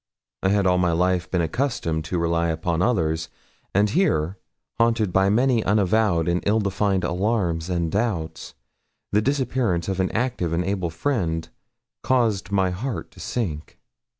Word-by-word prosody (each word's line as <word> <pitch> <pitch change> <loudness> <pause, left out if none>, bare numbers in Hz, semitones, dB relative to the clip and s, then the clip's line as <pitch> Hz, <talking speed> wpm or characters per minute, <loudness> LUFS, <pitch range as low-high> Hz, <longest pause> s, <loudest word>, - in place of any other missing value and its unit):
I 95 - +2
had 100 0 +2
all 90 -1 +3
my 90 -2 +2
life 90 +1 +1
been 90 - +1
accustomed 80 - -1
to 90 +3 -2
rely 85 0 +1
upon 85 +1 -1
others, 80 -8 0 0.4
and 100 +2 +3
here, 95 - +1 0.4
haunted 115 -5 +2
by 95 0 +4
many 120 +1 +3
unavowed 100 -4 +2
and 85 +1 +1
ill 110 +2 +3
defined 100 -2 0
alarms 90 -2 0
and 85 -3 -1
doubts, 100 -7 -2 0.6
the 105 - +3
disappearance 125 - 0
of 95 -1 -2
an 95 - +1
active 115 -8 -1
and 85 +1 0
able 95 -3 -1
friend 80 - -1 0.5
caused 110 -7 +1
my 95 -2 +2
heart 115 +7 -4
to - - -17
sink. 80 -11 -4
95 Hz, 150 wpm, -23 LUFS, 85-110 Hz, 0.6 s, by